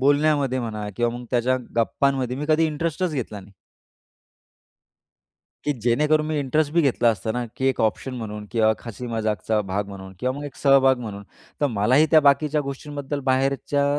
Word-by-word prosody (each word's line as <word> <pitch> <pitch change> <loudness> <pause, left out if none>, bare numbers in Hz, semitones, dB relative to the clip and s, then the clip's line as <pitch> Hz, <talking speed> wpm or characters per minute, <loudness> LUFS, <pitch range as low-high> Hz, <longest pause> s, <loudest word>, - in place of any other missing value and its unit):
बोलण्यामध्ये 145 -1 +2
म्हणा 110 -3 -4
किंवा 120 0 +1
मग 125 - -9
त्यांच्या 125 +1 +2 0.2
गप्पांमध्ये 130 +2 +1
मी 150 +2 -4
कधी 155 +1 +4
इंटरेस्टच 165 +3 -2
घेतला 115 -7 -4
नाही. 100 +1 -16 2.1
की 145 - +1
जेणेकरून 150 +6 +2
मी 155 -1 -1
इंटरेस्ट 145 +2 0
बी 170 - +4
घेतला 125 -4 +3
असता 110 0 -3
ना 125 +1 -2
की 130 - -1
एक 130 - -1
ऑप्शन 115 +4 -1
म्हणून 105 -3 -6
किंवा 110 -2 +3
हसी 120 +2 -6
मजाकचा 110 -1 -1
भाग 100 +1 -1
म्हणून 95 -1 -9
किंवा 125 +5 -1
मग 145 - -6
एक 145 - -7
सहभाग 135 -2 +4
म्हणून, 105 -4 -6 0.4
तर 145 - +3
मलाही 130 +6 +3
त्या 160 - +7
बाकीच्या 145 +1 +3
गोष्टींबद्दल 145 0 -5
बाहेरच्या 135 +2 +1
130 Hz, 165 wpm, -23 LUFS, 115-145 Hz, 2.1 s, त्या